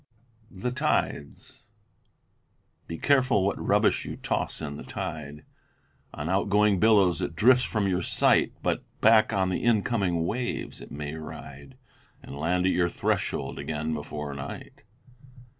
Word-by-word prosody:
THE 100 +6 -4
TIDES 130 - -2 1.2
Be 85 - -5
careful 130 - +3
what 100 - -1
rubbish - - +2
you - - -6
toss - - -2
in 75 -2 -5
the - - -8
tide. 75 -1 -6 0.7
On 75 - -4
outgoing 100 +2 +2
billows 100 -5 +4
it 85 - -3
drifts 125 +8 +5
from 105 -3 -1
your 90 -1 0
sight, - - +3
But - - 0 0.2
back 110 0 +5
on 95 -3 +1
the 90 - -2
incoming 100 -7 +1
waves 120 +6 -3
it - - -11
may 75 0 -6
ride 70 -3 -10 0.5
And - - -9
land 90 +5 0
at 95 - +3
your 85 -1 +1
threshold - - -2
again 75 +2 -3
before 75 -1 -5
night. 70 0 -8
90 Hz, 140 wpm, -27 LUFS, 75-105 Hz, 1.2 s, drifts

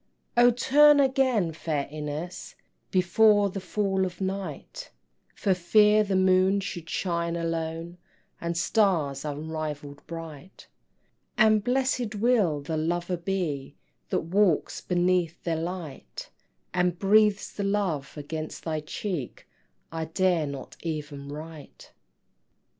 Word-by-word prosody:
O 240 0 +7
turn 290 +5 +5
again, 260 - +2
fair 155 -3 -3
Ines, 150 +3 -6 0.3
Before 200 +2 +4
the 195 - -4
fall 195 0 0
of 180 -2 -4
night, 190 -5 -5 0.5
For 195 - +1
fear 210 +4 +4
the 200 -2 -1
moon 185 +1 +4
should 175 -4 -6
shine 170 -1 -1
alone, 165 +1 -3 0.4
And 170 0 -2
stars 160 -6 +1
unrivall'd 150 -1 -5
bright; 165 0 -9 0.7
And 215 -2 +5
blessed 250 -3 0
will 205 -9 +2
the 155 +3 -3
lover 175 +3 -1
be 170 -6 -3 0.3
That - - 0
walks 180 0 +1
beneath 175 -2 0
their 165 -2 0
light, 170 -5 -7 0.4
And 180 -1 +1
breathes 205 +1 +3
the 200 - -3
love 195 -9 -1
against 155 +2 -6
thy 160 -2 -2
cheek 155 - -5 0.4
I 165 0 -3
dare 170 -1 +1
not 140 -2 -8
even 145 -4 -5
write! 155 0 -10
175 Hz, 115 wpm, -27 LUFS, 155-200 Hz, 0.7 s, O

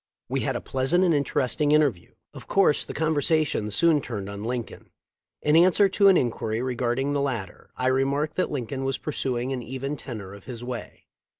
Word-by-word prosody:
We - - 0
had - - -1
a - - -3
pleasant 135 +8 +1
and 175 -3 +3
interesting 145 0 +1
inter 150 -2 +5
view. 85 -5 -20 0.2
Of - - -11
course 195 -7 +3
the - - -7
conversation 155 -6 +1
soon 155 +7 +3
turned 105 -6 -5
on 100 +1 -7
Lincoln. 120 0 -5 0.5
In 150 +1 +3
answer 185 +4 +6
to 200 +1 +4
an 190 -2 +7
inquiry 115 -2 -1
regarding 130 +2 -1
the 140 - 0
lat 115 -9 -2
ter - - -20
I 130 - -2
remarked 135 +4 +1
that 185 - +1
Lincoln 135 -1 -4
was 135 0 -1
pursuing 130 -4 -2
the 120 0 -9
even 135 +2 -3
tenor 110 -8 -8
of 100 - -13
his 120 -2 -7
way. 125 -1 -7
135 Hz, 195 wpm, -25 LUFS, 120-150 Hz, 0.5 s, an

